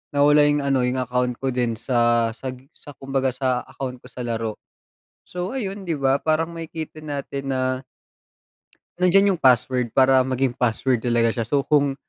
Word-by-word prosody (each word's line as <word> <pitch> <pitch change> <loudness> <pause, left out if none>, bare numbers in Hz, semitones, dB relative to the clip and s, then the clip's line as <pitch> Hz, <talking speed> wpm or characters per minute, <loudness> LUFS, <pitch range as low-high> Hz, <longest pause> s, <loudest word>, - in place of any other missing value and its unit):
nawala 145 +1 +5
'yung 145 0 +2
ano, 135 -2 +1
'yung 125 - -1
account 125 0 -1
ko 135 - +1
din 120 -2 0
sa 120 -1 +2
sa 130 -1 -5 0.2
sa 145 - -13
kumbaga 135 -1 -1
sa 130 -2 -1
account 130 -1 -6
ko - - -15
sa 125 - -9
laro. 115 -2 -3 0.7
So 180 +6 -5
ayun, 195 -4 -5
di 160 - +1
ba, 135 0 +2
parang 160 +2 0
makikita 160 -1 -7
natin 140 -2 -5
na, 130 - -1 1.4
nandiyan 195 +2 +5
'yung - - -24
password 125 -2 +3
para 130 0 +5
maging 130 -1 0
password 125 +1 +1
talaga 120 -1 +2
siya, 115 -2 -2
so 140 -1 +2
kung 145 -2 +2
135 Hz, 170 wpm, -23 LUFS, 125-145 Hz, 1.4 s, nawala